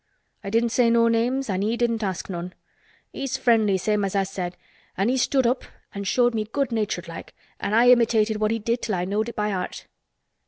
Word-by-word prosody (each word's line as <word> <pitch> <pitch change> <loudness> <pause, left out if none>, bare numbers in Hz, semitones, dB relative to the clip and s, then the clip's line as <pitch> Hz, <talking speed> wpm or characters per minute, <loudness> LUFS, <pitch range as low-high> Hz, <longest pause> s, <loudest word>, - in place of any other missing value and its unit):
I 195 - -4
didn't 230 +3 +2
say 240 -1 +3
no 230 0 +4
names 245 +4 0
an' 190 -2 -1
he 220 +3 0
didn't 235 -2 0
ask 190 -3 -3
none. 180 -1 -6 0.6
He's 270 -1 -3
friendly 225 -6 +3
same 210 +2 0
as 195 0 -2
I 195 - +3
said 185 -2 -5 0.4
an' 195 +4 +1
he 260 - +1
stood 260 0 +2
up 250 +2 +1 0.3
an' 200 0 -5
showed 240 +4 +2
me 215 -1 -1
good 270 +4 -2
natured 210 -6 -2
like, 165 - -9 0.2
an' 205 - -1
I 240 +2 +6
imitated 225 -3 +3
what 215 0 +1
he 225 - 0
did 230 +2 -2
till 215 - -1
I 175 0 -1
knowed 210 +4 -1
it 235 - -9
by 210 0 -1
heart." 185 -2 -4
220 Hz, 220 wpm, -24 LUFS, 195-235 Hz, 0.6 s, I